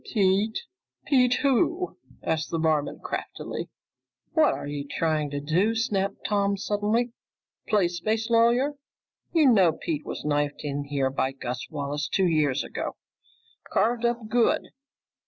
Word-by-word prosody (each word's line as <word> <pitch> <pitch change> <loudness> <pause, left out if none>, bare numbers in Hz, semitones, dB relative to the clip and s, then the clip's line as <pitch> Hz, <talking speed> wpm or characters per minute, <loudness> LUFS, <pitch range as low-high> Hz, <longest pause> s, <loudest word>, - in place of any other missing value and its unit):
"Pete? 205 +1 +2 0.5
Pete 250 -3 +4
who?" 330 +7 +2 0.3
asked 160 -1 -1
the 165 - -1
barman 160 -2 0
craftily. - - -5 0.6
"What 315 -2 +4
are - - -6
you 145 0 -4
trying 155 -2 0
to 145 0 -3
do?" 175 +10 +1
snapped 200 -3 -1
Tom 200 -1 +1
suddenly. 210 +4 0 0.6
"Play 205 -5 +3
space 215 +6 -1
lawyer? 235 +5 +4 0.6
You 320 -3 +4
know 185 -6 +5
Pete 155 -2 -3
was - - -6
knifed 145 -1 0
in 145 -1 -3
here 140 -2 0
by 135 0 -1
Gus 125 -1 -5
Wallace 145 -1 -3
two 190 - +3
years 155 -6 +2
ago! - - -4 0.8
Carved 235 +1 +2
up 235 -2 0
good!" 235 +1 +2
190 Hz, 135 wpm, -26 LUFS, 145-230 Hz, 0.8 s, know